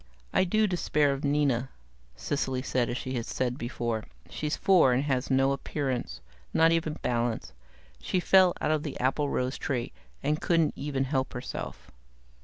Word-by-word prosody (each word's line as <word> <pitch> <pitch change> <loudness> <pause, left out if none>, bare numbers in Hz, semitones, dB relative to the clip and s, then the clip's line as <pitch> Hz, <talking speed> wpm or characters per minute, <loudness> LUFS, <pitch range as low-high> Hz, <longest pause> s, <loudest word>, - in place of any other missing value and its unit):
"I 185 - +4
do 215 +4 +2
despair 150 -6 +1
of 135 - -6
Nina," 140 -3 +1 0.5
Cecily 130 - -2
said, 125 -3 0
as 120 - -2
she 130 0 -4
had 120 -3 -3
said 125 -1 -1
before. 120 -3 -3 0.3
"She's 150 0 -2
four, 175 -10 +5
and 130 +3 +1
has 135 -3 -1
no 135 0 +3
appearance. 130 - -3 0.3
Not 165 0 +5
even 165 -2 +1
balance. 120 -1 -1 0.5
She 185 - 0
fell 185 0 +5
out - - 0
of 155 -1 +1
the 150 -3 -5
applerose 130 0 0
tree, 130 -6 -2 0.3
and 150 +2 0
couldn't 165 -3 +2
even 135 -1 -2
help 135 -1 -1
herself." 125 - -6
135 Hz, 160 wpm, -28 LUFS, 125-155 Hz, 0.5 s, four